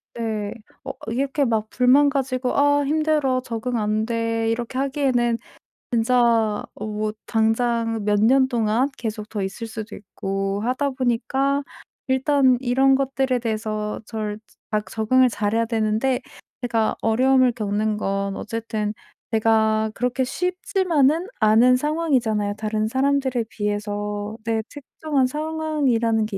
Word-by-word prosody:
네 215 Hz, -3 st, -3 dB, 0.3 s
어 -, -, -4 dB, 0.2 s
이렇게 275 Hz, +4 st, 0 dB
막 220 Hz, -3 st, 0 dB
불만 260 Hz, +3 st, +4 dB
가지고 260 Hz, -2 st, -1 dB
'아 285 Hz, 0 st, +4 dB
힘들어 300 Hz, -3 st, +1 dB
적응 240 Hz, 0 st, -3 dB
안 215 Hz, 0 st, 0 dB
돼.' 230 Hz, -1 st, -1 dB
이렇게 235 Hz, +2 st, -3 dB
하기에는 260 Hz, -4 st, +1 dB, 0.5 s
진짜 245 Hz, +1 st, +3 dB, 0.5 s
어 210 Hz, -, -6 dB
뭐 215 Hz, 0 st, -2 dB
당장 225 Hz, 0 st, +1 dB
몇 205 Hz, -1 st, +2 dB
년 260 Hz, +3 st, +5 dB
동안 235 Hz, +2 st, +1 dB
계속 215 Hz, -2 st, -5 dB
더 210 Hz, -, -3 dB
있을 195 Hz, +4 st, -5 dB
수도 220 Hz, -1 st, -7 dB
있고 195 Hz, 0 st, -3 dB
하다 255 Hz, +5 st, 0 dB
보니까 265 Hz, +2 st, 0 dB, 0.5 s
일단 265 Hz, -1 st, +3 dB
이런 265 Hz, +1 st, +3 dB
것들에 270 Hz, -1 st, 0 dB
대해서 215 Hz, -2 st, -3 dB
절 215 Hz, -2 st, -4 dB, 0.3 s
막 210 Hz, -1 st, 0 dB
적응을 255 Hz, +4 st, +3 dB
잘해야 225 Hz, 0 st, 0 dB
되는데 225 Hz, +3 st, 0 dB, 0.4 s
제가 230 Hz, -3 st, 0 dB
어려움을 255 Hz, +2 st, +3 dB
겪는 215 Hz, -1 st, -1 dB
건 195 Hz, -1 st, -2 dB
어쨌든 220 Hz, -1 st, -3 dB, 0.4 s
내가 220 Hz, -1 st, +2 dB
그렇게 250 Hz, +2 st, 0 dB
쉽지만은 345 Hz, 0 st, +1 dB
않은 225 Hz, +3 st, +5 dB
상황이잖아요 255 Hz, -8 st, 0 dB
다른 215 Hz, 0 st, -1 dB
사람들에 265 Hz, -1 st, +1 dB
비해서. 205 Hz, 0 st, -3 dB
내 225 Hz, -1 st, 0 dB
특정한 290 Hz, -1 st, -2 dB
상황이라는 280 Hz, -7 st, 0 dB
게 205 Hz, -3 st, -4 dB
230 Hz, 270 characters per minute, -23 LUFS, 215-265 Hz, 0.5 s, 년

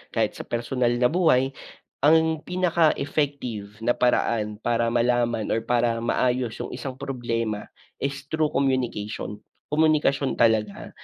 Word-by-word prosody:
kahit -, -, +2 dB
sa -, -, -7 dB
personal 120 Hz, +1 st, 0 dB
na 125 Hz, +2 st, +2 dB
buhay. 155 Hz, -7 st, +3 dB, 0.5 s
Ang 160 Hz, +1 st, +4 dB
pinaka 175 Hz, -3 st, +2 dB
effective 130 Hz, -8 st, -3 dB
na 120 Hz, -, +4 dB
paraan 110 Hz, -3 st, +1 dB
para 115 Hz, 0 st, 0 dB
malaman 120 Hz, -1 st, +1 dB
or 115 Hz, -, +1 dB
para 120 Hz, -1 st, +1 dB
maayos 125 Hz, 0 st, 0 dB
yung -, -, -6 dB
isang 130 Hz, -2 st, -6 dB
problema 115 Hz, -5 st, -3 dB, 0.3 s
is 140 Hz, 0 st, -3 dB
through 155 Hz, -1 st, +2 dB
communication. 125 Hz, -6 st, -1 dB, 0.3 s
Komunikasyon 150 Hz, -3 st, +2 dB
talaga, 110 Hz, -3 st, +1 dB
125 Hz, 125 wpm, -25 LUFS, 115-140 Hz, 0.5 s, Ang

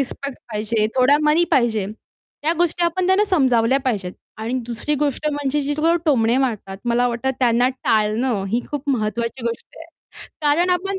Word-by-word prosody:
Respect 275 Hz, 0 st, -5 dB
पाहिजे, 215 Hz, +1 st, 0 dB
थोडा 260 Hz, +3 st, +5 dB
मनी 305 Hz, +3 st, +4 dB
पाहिजे, 225 Hz, -6 st, +2 dB, 0.6 s
त्या 315 Hz, -, +2 dB
गोष्टी 350 Hz, 0 st, +1 dB
आपण 355 Hz, +2 st, 0 dB
त्यांना 380 Hz, +3 st, +4 dB
समजावल्या 265 Hz, -, +2 dB
पाहिजेत. 200 Hz, -8 st, -1 dB, 0.3 s
आणि 225 Hz, +3 st, -3 dB
दुसरी 240 Hz, +5 st, -1 dB
गोष्ट 290 Hz, +1 st, -1 dB
म्हणजे 290 Hz, 0 st, -1 dB
जे 285 Hz, +1 st, -1 dB
लोकं 330 Hz, +3 st, +2 dB
टोमणे 235 Hz, -5 st, +3 dB
मारतात, 220 Hz, -7 st, -2 dB
मला 240 Hz, +1 st, +2 dB
वाटतं 240 Hz, +2 st, -1 dB
त्यांना 245 Hz, 0 st, +3 dB
टाळणं, 220 Hz, -2 st, 0 dB
ही 230 Hz, +5 st, 0 dB
खूप 290 Hz, -1 st, -5 dB
महत्त्वाची 230 Hz, 0 st, -2 dB
गोष्ट 230 Hz, 0 st, -6 dB
आहे. 325 Hz, -, -10 dB, 0.6 s
कारण 325 Hz, +5 st, +3 dB
आपण 385 Hz, +2 st, -1 dB
260 Hz, 165 wpm, -21 LUFS, 230-300 Hz, 0.6 s, थोडा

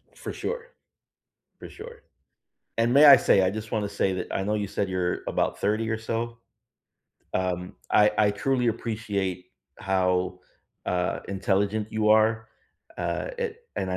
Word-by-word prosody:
For -, -, -7 dB
sure. 475 Hz, -1 st, -4 dB, 0.9 s
For -, -, -9 dB
sure. 470 Hz, +1 st, -11 dB, 0.8 s
And 115 Hz, +1 st, +2 dB
may 145 Hz, +3 st, +8 dB
I 140 Hz, -2 st, +11 dB
say 100 Hz, -, +4 dB
I 95 Hz, -, +3 dB
just 110 Hz, +2 st, -6 dB
want 105 Hz, -1 st, 0 dB
to 100 Hz, -, -13 dB
say, 95 Hz, -1 st, +1 dB
that 95 Hz, -, -4 dB
I 95 Hz, -, -1 dB
know 105 Hz, +2 st, -1 dB
you 105 Hz, -1 st, -2 dB
said 100 Hz, 0 st, -2 dB
you're 90 Hz, -1 st, -1 dB
about -, -, -1 dB
30 110 Hz, +3 st, 0 dB
or 110 Hz, -, 0 dB
so. 115 Hz, +1 st, -3 dB, 1.0 s
Um, 90 Hz, -1 st, -2 dB, 0.2 s
I 105 Hz, 0 st, +5 dB
I 105 Hz, -1 st, +4 dB
truly 125 Hz, +5 st, 0 dB
appreciate 105 Hz, -5 st, -2 dB, 0.3 s
how, 90 Hz, -1 st, 0 dB, 0.5 s
uh, 90 Hz, 0 st, -1 dB
intelligent 100 Hz, +2 st, 0 dB
you 110 Hz, -1 st, +1 dB
are. 110 Hz, +1 st, +3 dB, 0.5 s
Uh, -, -, -2 dB
a 470 Hz, -3 st, -3 dB, 0.2 s
and 95 Hz, -, -2 dB
I 90 Hz, -, -1 dB
105 Hz, 160 wpm, -26 LUFS, 95-115 Hz, 1.0 s, I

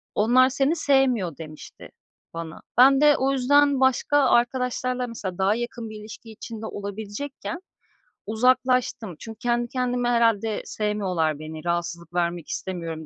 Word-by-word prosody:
"Onlar 245 Hz, +5 st, +4 dB
seni 275 Hz, +4 st, +1 dB
sevmiyor." 260 Hz, -, +1 dB
demişti 155 Hz, -2 st, -11 dB, 0.4 s
bana. 165 Hz, -1 st, -7 dB, 0.2 s
Ben 270 Hz, +3 st, +7 dB
de 295 Hz, -1 st, +6 dB
o 270 Hz, +1 st, +1 dB
yüzden 280 Hz, +1 st, +3 dB
başka 265 Hz, +2 st, +2 dB
arkadaşlarla 250 Hz, 0 st, +1 dB
mesela, 195 Hz, -6 st, -6 dB
daha 195 Hz, +3 st, +2 dB
yakın 240 Hz, -1 st, -5 dB
bir 215 Hz, 0 st, -9 dB
ilişki 220 Hz, +1 st, -11 dB
içinde 220 Hz, 0 st, -8 dB
olabilecekken 220 Hz, -, -6 dB, 0.6 s
uzaklaştım. 250 Hz, -3 st, +1 dB
Çünkü 225 Hz, -1 st, -9 dB
kendi 240 Hz, 0 st, 0 dB
kendime, 245 Hz, -1 st, -1 dB
"Herhâlde 225 Hz, -3 st, +2 dB
sevmiyorlar 185 Hz, -8 st, -1 dB
beni, 155 Hz, +1 st, -8 dB
rahatsızlık 170 Hz, -1 st, -3 dB
vermek 175 Hz, -2 st, -1 dB
istemiyorum." 165 Hz, -4 st, -5 dB
230 Hz, 130 wpm, -24 LUFS, 185-255 Hz, 0.6 s, Ben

